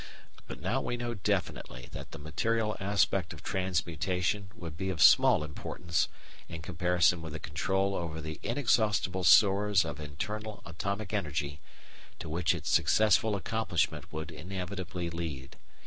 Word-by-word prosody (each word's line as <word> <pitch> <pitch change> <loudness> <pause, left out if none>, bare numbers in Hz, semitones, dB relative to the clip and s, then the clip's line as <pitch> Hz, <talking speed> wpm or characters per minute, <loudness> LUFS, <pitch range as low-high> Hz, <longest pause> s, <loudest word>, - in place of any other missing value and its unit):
But - - -7
now - - 0
we 120 - -2
know 120 0 -3
definitely 65 - -2
that - - -8
the - - -9
material 105 +9 -1
aspect 95 -3 +1
of 75 - -12
transmutation 90 +2 -1
would 85 -7 -7
be 95 +3 -3
of 90 -4 -3
small 75 - +7
importance 80 +2 -2 0.4
in 85 -1 -7
comparison 90 0 +2
with 80 -2 -7
the 80 - -5
control 95 +6 0
over 80 -4 -3
the 80 0 -6
inexhaustible 110 -6 +1
stores 100 +1 +6
of 75 -2 -5
internal 105 +8 -5
atomic 100 +4 -4
energy 75 -6 -2 0.6
to 80 - -7
which 85 +1 +1
its - - -3
successful 110 0 +4
accomplishment 100 -2 -1
would 80 +1 -5
inevitably 90 -1 -5
lead. 80 -6 -5
90 Hz, 140 wpm, -30 LUFS, 80-100 Hz, 0.6 s, small